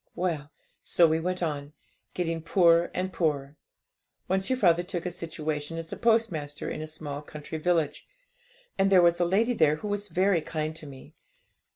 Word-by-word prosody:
'Well, 165 -5 -2 0.3
so 170 - +4
we 160 0 +1
went 180 +2 -2
on, 145 -2 -3 0.4
getting 165 -2 -1
poorer 170 0 +4
and 185 0 -2
poorer. 145 -4 -1 0.7
Once 190 +1 0
your 260 - +1
father 175 -7 +4
took 175 -1 -5
a 180 - -2
situation 155 -2 -4
as 165 0 -6
a - - -3
post 225 -1 +3
master 145 -2 -5
in 155 - -4
a 155 - -5
small 150 -2 -6
country 150 +1 -7
village, 160 -3 0 0.7
and 195 0 +3
there 185 -2 +7
was 170 0 +4
a 175 - +3
lady 215 +8 +2
there 155 -9 +3
who 210 - -6
was 205 0 -2
very 185 0 +2
kind 155 0 -3
to 155 - -10
me. 135 -2 -12
165 Hz, 185 wpm, -28 LUFS, 155-185 Hz, 0.7 s, there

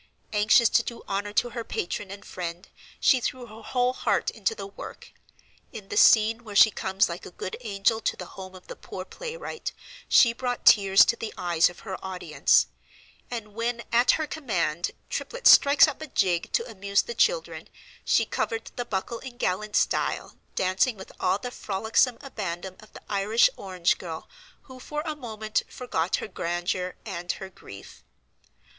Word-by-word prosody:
Anxious 215 +3 +5
to - - +4
do 235 0 -7
honor 200 +1 -2
to 240 +3 +2
her 235 -1 -4
patron 190 0 -4
and 200 +1 -9
friend 175 0 -6 0.3
she 260 -3 +4
threw 250 +1 -3
her 220 -1 -12
whole 250 +2 0
heart - - 0
into 450 - -1
the - - -6
work; 395 - -10 0.6
in 205 -3 -10
the - - -4
scene 225 +1 +5
where 210 -3 -9
she 220 +2 +8
comes 190 0 +1
like 170 0 -6
a - - -8
good 185 +1 -6
angel 220 0 0
to - - -1
the 180 - -6
home 190 -1 -9
of 185 - -13
the - - -8
poor 185 -1 -8
play 485 - -7
wright, 485 -1 -5 0.4
she 235 -2 +6
brought 245 0 -3
tears 195 -2 +7
to 235 - +1
the 225 -1 -5
eyes 175 -2 +3
of 175 - -13
her 190 -3 -7
audience; 190 -1 +2 0.6
and 225 -4 -6
when 235 +2 -2
at 240 +2 +5
her 315 - -1
command 180 - -1 0.2
Triplet - - -5
strikes 285 +1 +8
up - - -5
a 315 - -5
jig 180 - 0
to 230 - +1
amuse 200 -3 0
the 475 - -6
children - - 0 0.3
she - - +3
"covered 455 -1 -3
the 245 - -2
buckle" 225 +3 -3
in 250 -1 -10
gallant 210 -1 -2
style, - - 0 0.2
dancing 190 +5 +1
with 190 - -10
all 185 +1 +2
the 245 +3 -6
frolicsome 220 +4 +1
abandon 190 -7 -5
of 215 - -16
the - - -12
Irish 205 +3 +3
orange 185 -3 0
girl 165 -3 -7 0.4
who 260 -1 -13
for 300 +3 -4
a 310 -1 -4
moment 220 -5 -2
forgot 185 -9 -1
her - - -4
grandeur 175 0 -2
and 180 -4 -3
her 190 0 -9
grief. 100 - -13
215 Hz, 180 wpm, -26 LUFS, 185-245 Hz, 0.6 s, she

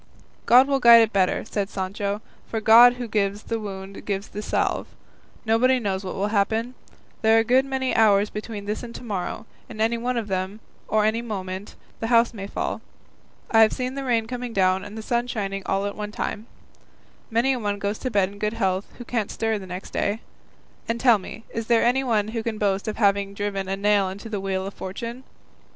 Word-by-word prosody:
"God 255 +3 +7
will 275 -1 +1
guide 235 -2 +9
it 225 - -2
better," 190 -2 +1
said 200 -2 -2
Sancho, 200 +2 -3 0.2
"for 225 - -2
God 235 +3 +8
who 245 -1 -5
gives 205 -1 -1
the 230 - -3
wound 195 -2 -7
gives 200 -1 -3
the 210 - -6
salve; - - -1 0.6
nobody 245 +4 +3
knows 200 -5 -2
what 185 - -5
will 200 +2 -1
happen; 220 +4 0 0.5
there 220 0 +5
are - - +6
a - - 0
good 255 +3 +3
many 265 -1 -1
hours 210 -2 +4
between 210 -1 -6
this 210 +1 -3
and 235 -1 -9
to - - -8
morrow, 205 -2 -4 0.2
and 220 -3 -9
any 230 +1 +1
one 245 +1 -1
of 225 -3 -2
them, 190 +2 -3 0.3
or 215 -1 +2
any 220 +2 +1
moment, 195 -3 -6 0.2
the 225 - -2
house 235 0 +4
may 200 -3 -6
fall; - - -3 0.7
I 225 - +5
have 220 - +5
seen 255 0 -3
the 275 0 -4
rain 235 -4 +1
coming 245 0 -5
down 190 -1 +2
and 205 +2 -9
the 220 - -6
sun 240 +2 0
shining 195 -4 -3
all 195 +1 0
at 205 - -3
one 210 0 -5
time; 215 +1 -4 0.8
many 235 +4 +2
a 255 - -2
one 205 -2 -1
goes 200 +1 -3
to 255 - -2
bed 200 -5 +2
in 200 0 -13
good 210 +1 -1
health 190 -3 -1
who 245 - -9
can't 225 -4 -2
stir 225 -1 -1
the 190 - -10
next 180 +2 -7
day. 205 +3 -1 0.7
And 230 +1 -1
tell 235 -4 +5
me, 215 +4 -9
is 225 -1 -4
there 235 -1 +4
anyone 240 -4 +2
who 225 0 -3
can 220 -1 -3
boast 200 0 0
of 215 - -3
having 200 -2 +2
driven 200 -2 -3
a 195 - -1
nail 200 -1 +2
into 200 +4 -8
the 205 -3 -3
wheel 190 -1 -2
of 195 - -6
fortune? 230 +7 -6
215 Hz, 215 wpm, -24 LUFS, 200-235 Hz, 0.8 s, guide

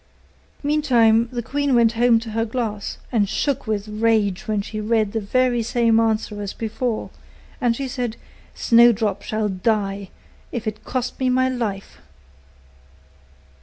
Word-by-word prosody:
Meantime 240 -6 +3
the 240 -1 -3
queen 285 +1 0
went 230 -2 +5
home 235 0 +4
to 225 -1 -8
her 225 +1 0
glass, 220 -3 -3
and 210 -5 +1
shook 280 -5 -1
with 210 -1 -2
rage 215 -3 0
when 215 -1 0
she 215 +2 -4
read 215 -1 +1
the 225 - -1
very 245 +3 +1
same 230 0 +2
answer 215 -2 0
as 200 -1 -4
before; 225 +1 -3 0.5
and 240 -2 +2
she 270 +2 -3
said, 245 -3 -3 0.4
'Snowdrop 230 -4 +4
shall 215 -1 -2
die, 195 0 -1 0.4
if 235 - -4
it 215 -1 -4
cost 250 -1 -3
me 260 -1 +1
my 260 +1 +3
life. 220 -6 -4
225 Hz, 145 wpm, -22 LUFS, 215-245 Hz, 0.5 s, went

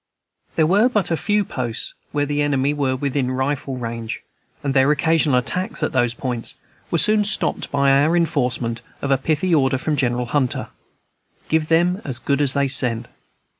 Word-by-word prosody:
There 160 - +3
were 205 +9 +4
but 210 -6 0
few 205 -1 +1
posts 120 -6 -4 0.2
where 145 -1 0
the 145 0 -1
enemy 145 -1 +1
were 135 -3 0
within 135 -1 -1
rifle 130 +1 -2
range, 115 -2 -5 0.4
and 140 -2 -1
their 135 +1 +4
occasional 155 -2 +2
attacks 185 - -2
at - - 0
those 120 -2 +1
points 120 -2 -4 0.3
were 170 - +1
soon 210 +4 +3
stopped 210 - -1
by 140 -1 +2
our 145 +5 +3
enforcement 125 -8 0 0.2
of 140 - -1
a 135 - +4
pithy 160 +5 0
order 135 -3 +3
from 150 +3 -1
General 125 -3 0
Hunter, 130 0 -1 0.8
"Give 160 -1 +1
them 175 +4 +2
as 130 -4 -3
good 140 +3 0
as 140 -2 +4
they 140 -1 +1
send." 120 -3 +3
140 Hz, 170 wpm, -21 LUFS, 130-160 Hz, 0.8 s, were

